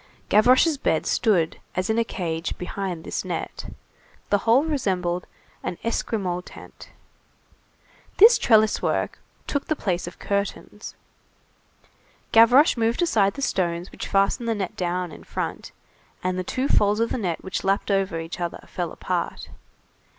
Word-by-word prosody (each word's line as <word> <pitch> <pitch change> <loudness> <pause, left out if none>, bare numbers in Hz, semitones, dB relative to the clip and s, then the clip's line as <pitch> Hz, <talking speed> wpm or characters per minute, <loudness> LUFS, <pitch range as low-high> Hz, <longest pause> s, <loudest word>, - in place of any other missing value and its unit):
Gavroche's 255 +8 +5
bed 160 - 0
stood 180 -9 +1 0.2
as 185 +1 -1
in 220 +1 +1
a - - +3
cage, 170 -6 -4
behind 180 -2 -4
this - - -3
net. - - -5 0.6
The 205 - +4
whole 235 +6 +4
resembled 185 - -1 0.3
an 175 - -4
Esquimaux 195 -6 -2
tent. - - -13 1.3
This 450 +4 +8
trellis 220 -2 +4
work - - -1 0.3
took 285 - -2
the 310 - +1
place 180 -9 -2
of 175 - -9
curtains. 200 0 -4 1.4
Gavroche 245 +6 +6
moved 230 +7 +1
aside 205 - +2
the 275 - -4
stones 175 -5 -1
which - - -6
fastened 195 +4 +1
the 225 - +1
net 195 -4 -4
down 180 -1 -2
in - - -12
front, - - -5 0.5
and 185 0 0
the 185 - -2
two 255 +8 -2
folds 210 -3 +3
of 230 0 0
the - - -1
net 175 -6 -3
which 190 - -4
lapped 195 +1 0
over 195 -4 0
each 165 +2 -6
other 175 -1 -4
fell - - -4
apart. - - -4
200 Hz, 150 wpm, -24 LUFS, 180-230 Hz, 1.4 s, This